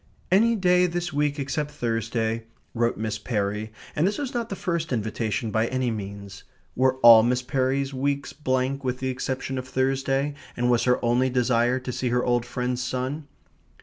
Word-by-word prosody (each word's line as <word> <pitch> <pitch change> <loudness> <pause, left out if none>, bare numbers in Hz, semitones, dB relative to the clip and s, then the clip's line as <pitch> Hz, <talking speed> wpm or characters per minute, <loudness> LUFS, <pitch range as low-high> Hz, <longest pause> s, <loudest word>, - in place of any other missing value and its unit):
"Any 230 +5 +4
day 180 -2 +4
this 175 -1 -3
week 145 0 0
except 145 +2 -2
Thursday," 115 -3 -2 0.3
wrote 120 0 0
Miss 110 -1 -3
Perry, 105 -1 -2 0.2
and 160 +5 +2
this 205 - -1
was 280 -3 -4
not 235 -2 -2
the 195 - -3
first 170 -4 -2
invitation 110 0 -2
by 110 +2 +1
any 130 -1 -1
means. 100 -2 -7 0.3
Were 130 +1 +3
all 115 -1 +10
Miss 125 +2 +1
Perry's 135 +1 0
weeks 140 +1 -2
blank 130 -1 -1
with 125 -1 -1
the 130 0 -2
exception 130 +1 -3
of 130 - -7
Thursday, 135 +2 0 0.2
and 120 0 +2
was 120 - +2
her 125 0 +4
only 125 +2 +2
desire 125 0 +2
to 125 - -4
see 125 +1 -2
her 125 +1 +1
old 120 -1 +1
friend's 125 0 -2
son? 130 +4 -3
130 Hz, 180 wpm, -25 LUFS, 120-140 Hz, 0.3 s, all